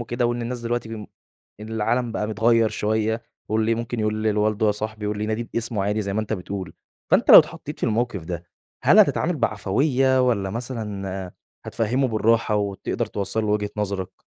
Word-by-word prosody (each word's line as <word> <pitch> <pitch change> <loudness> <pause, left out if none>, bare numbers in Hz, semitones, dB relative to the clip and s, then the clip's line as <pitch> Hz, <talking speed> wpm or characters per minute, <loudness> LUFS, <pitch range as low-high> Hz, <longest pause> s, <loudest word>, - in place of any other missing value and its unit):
وكده 120 +1 -1
وإن 120 0 -1
الناس 120 +1 -4
دلوقتي 120 0 -2
بم 110 -2 -7 0.5
إن 110 - -8
العالم 115 +2 0
بقى 105 - -2
متغيّر 115 +1 +3
شوية، 110 +2 -1 0.3
واللي 110 +1 +1
ممكن 115 0 -4
يقول 110 0 -1
لل 110 -1 +1
والده 110 +1 +1
يا 105 - +4
صاحبي 110 0 -5
واللي 105 0 -2
يناديه 110 +2 -2
باسمه 115 -3 -1
عادي 105 +2 0
زي 100 -1 -3
ما 110 - +1
أنت 110 - -4
بتقول، 95 -3 -5 0.4
فأنت - - +4
لو - - +13
اتحطّيت - - -1
في - - +1
الموقف 110 -5 -1
ده 85 0 -5 0.4
هل - - +6
هتتعامل 170 +1 +4
بعفوية 130 +4 +1
والّا 100 -5 0
مثلًا 100 -5 -5 0.3
هتفهمه 125 +4 0
بالراحة، 115 0 +2
وتقدر 100 -1 -2
توصل 100 +2 -2
له - - -2
وجهة 105 -1 0
نظرك؟ 100 -3 -4
110 Hz, 180 wpm, -23 LUFS, 105-115 Hz, 0.5 s, لو